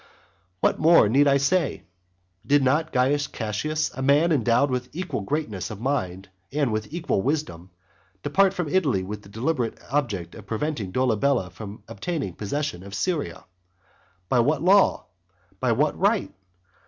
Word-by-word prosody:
What - - +2
more 165 -8 +6
need 140 +7 +4
I 140 0 +5
say? 150 +3 0 0.6
Did 145 -1 +3
not 150 +5 +1
Caius 140 +3 +2
Cassius, 120 +8 -2
a 135 - -6
man 145 +5 +4
endowed 130 0 +3
with 125 0 -2
equal 180 - -3
greatness 110 - -3
of 110 -3 -7
mind 100 -8 -2 0.2
and 140 -5 0
with 110 +2 -3
equal 165 - -1
wisdom, 95 - -2 0.5
depart 190 +6 +3
from 175 -4 -2
Italy 145 - +1
with 105 +2 -6
the 100 - -16
deliberate 120 +3 -2
object 105 - -1
of 105 -3 -12
preventing 115 -3 -3
Dolabella 125 -3 +1
from 100 +2 -9
obtaining 115 - -4
possession 140 - -3
of 100 +1 -8
Syria? 145 - -2 0.8
By 125 - +2
what 145 +5 +2
law? 195 +2 +4 0.5
By 125 - +1
what 145 +6 +1
right? 205 +2 +1
135 Hz, 150 wpm, -25 LUFS, 105-155 Hz, 0.8 s, more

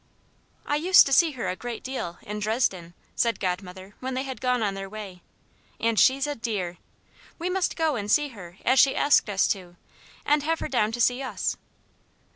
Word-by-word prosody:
"I 290 - 0
used 350 +4 +7
to 275 - 0
see 325 +1 +5
her 250 - -4
a 185 - -2
great 240 +2 -6
deal, 255 -10 -5
in 210 +1 -5
Dresden," 205 -6 -1 0.2
said 230 -4 +1
Godmother 185 +1 -4
when 260 0 -4
they 260 - -1
had 265 -2 -7
gone 250 -2 +1
on 200 -2 0
their 195 0 -6
way, 195 -4 -9 0.6
"and 230 -2 +1
she's 270 +2 +4
a 295 - -2
dear. 205 -8 -4 0.6
We 355 +2 -3
must 375 -1 0
go 320 -3 +1
and 205 -3 -4
see 295 +6 +3
her 185 -7 -12
as 260 +2 +4
she 275 - +5
asked 285 -6 +3
us 195 -1 +2
to, 180 -3 -3 0.5
and 295 0 +3
have 325 +3 -1
her - - -3
down 215 -4 +1
to 240 - -4
see 245 +3 +2
us." 265 - -2
230 Hz, 200 wpm, -26 LUFS, 195-275 Hz, 0.6 s, used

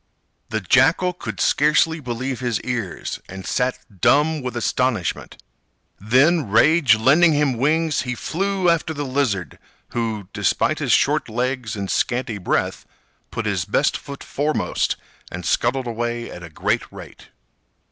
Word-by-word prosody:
The 110 -1 -2
Jackal 135 - +3
could 110 - -7
scarcely 155 +2 +3
believe 130 -1 -4
his 120 -4 -1
ears, 120 -7 -4
and 95 0 -8
sat 125 0 0 0.2
dumb 150 +2 +3
with 125 -2 -4
astonishment. 120 -5 -1 0.6
Then, 130 - +3
rage 140 +3 +5
lending 155 +9 +4
him 145 -3 +1
wings, 155 +5 +1
he 125 -1 -3
flew 190 - -1
after 165 -2 +1
the 145 0 -3
Lizard, 130 -9 -1 0.3
who, 110 -4 -3
despite - - +1
his - - -1
short - - +2
legs 125 0 -2
and 100 -1 -4
scanty 120 -3 -1
breath, 90 - -1 0.5
put 115 -1 -4
his 100 -4 0
best 105 +9 +1
foot 140 -1 -8
foremost, 150 +2 -1 0.4
and 90 0 -6
scuttled 125 +2 +1
away 120 0 -3
at 90 - -9
a 85 - -9
great 75 - -1
rate. - - -12
125 Hz, 140 wpm, -21 LUFS, 110-150 Hz, 0.6 s, rage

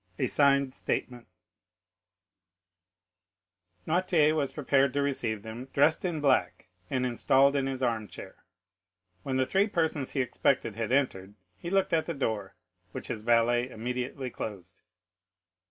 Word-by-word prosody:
A - - 0
Signed 140 -2 +3
Statement 125 -2 -4 2.6
Noirtier 165 -3 +3
was 145 -3 0
prepared 140 -2 +1
to 145 - +1
receive 115 -7 -2
them, 115 +3 -7
dressed 155 +3 +3
in 175 -4 -2
black, 130 -11 +1 0.2
and 130 -1 0
installed 135 +3 +3
in 135 -1 0
his 130 -1 -3
armchair. 115 -4 -3 0.8
When 130 +3 -2
the 130 - +2
three 195 +8 +2
persons 160 -8 -1
he 135 - +1
expected 125 -3 0
had 115 +1 -3
entered, 105 -8 0 0.2
he 170 - -7
looked 195 -1 +1
at 160 -1 +1
the 170 - -3
door, 110 -7 -3 0.4
which - - -6
his 110 - -4
valet 120 +2 +2
immediately 125 +3 -4
closed. 95 -7 -7
130 Hz, 135 wpm, -29 LUFS, 115-145 Hz, 2.6 s, Signed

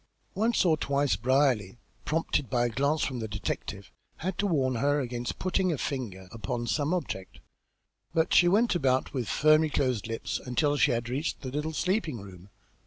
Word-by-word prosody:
Once 220 0 +2
or 165 -3 +5
twice 140 -1 +1
Brierly, 125 -5 +1 0.3
prompted 150 -5 0
by 120 -1 +2
a - - +1
glance 140 +5 +1
from 130 -3 -2
the 110 - -3
detective, 105 -1 -5 0.3
had 185 +2 -3
to 205 - +2
warn 135 -8 +1
her 145 +4 +2
against 120 -2 -3
putting 185 0 0
a 155 - -1
finger 110 -10 -4
upon 115 +2 -4
some 145 +5 0
object, 95 - -4 0.7
but 160 0 +1
she 175 - +6
went 215 +7 +3
about 130 -6 +1
with 125 -6 -2
firmly 155 +1 +4
closed 130 -7 0
lips 115 0 -3
until 145 +4 0
she 145 - +4
had 120 0 -1
reached 135 +6 -2
the 130 -2 -5
little 150 +3 -2
sleeping 165 - -1
room. 95 -1 -12
135 Hz, 175 wpm, -28 LUFS, 120-155 Hz, 0.7 s, she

